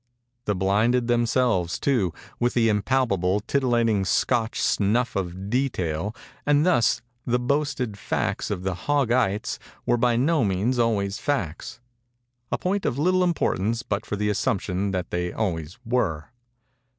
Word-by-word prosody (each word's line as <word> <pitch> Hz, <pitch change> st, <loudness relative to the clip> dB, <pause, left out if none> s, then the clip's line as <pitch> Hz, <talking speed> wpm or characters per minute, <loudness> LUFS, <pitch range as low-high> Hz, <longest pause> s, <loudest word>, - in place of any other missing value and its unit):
They 105 Hz, -, +1 dB
blinded 105 Hz, +6 st, +2 dB
themselves, 120 Hz, -7 st, +1 dB
too, 120 Hz, -11 st, +1 dB, 0.3 s
with 120 Hz, 0 st, +1 dB
the 115 Hz, -2 st, +4 dB
impalpable, 105 Hz, -4 st, +1 dB
titillating 115 Hz, -4 st, +1 dB
Scotch 115 Hz, +4 st, +1 dB
snuff 115 Hz, +4 st, +1 dB
of 95 Hz, +1 st, -4 dB
detail; 105 Hz, -, -1 dB, 0.3 s
and 145 Hz, +1 st, +3 dB
thus 120 Hz, -, +3 dB, 0.2 s
the 120 Hz, 0 st, +1 dB
boasted 125 Hz, -4 st, -1 dB
facts -, -, -2 dB
of 95 Hz, -3 st, -3 dB
the 95 Hz, 0 st, -1 dB
Hog 140 Hz, -, 0 dB
ites 115 Hz, -3 st, +1 dB, 0.3 s
were 120 Hz, -, +2 dB
by 120 Hz, 0 st, +2 dB
no 145 Hz, +4 st, +2 dB
means 105 Hz, +6 st, 0 dB
always 105 Hz, -4 st, +1 dB
facts—a 120 Hz, -, -5 dB
point 195 Hz, +2 st, -1 dB
of 120 Hz, -, -1 dB
little 185 Hz, +5 st, +3 dB
importance 115 Hz, -, 0 dB
but 100 Hz, -3 st, -2 dB
for 105 Hz, -, -4 dB
the 105 Hz, +1 st, 0 dB
assumption 100 Hz, -3 st, -1 dB
that 95 Hz, -2 st, -3 dB
they 90 Hz, 0 st, -1 dB
always 85 Hz, -6 st, -3 dB
were. 110 Hz, -11 st, -1 dB
115 Hz, 140 wpm, -25 LUFS, 100-125 Hz, 0.3 s, the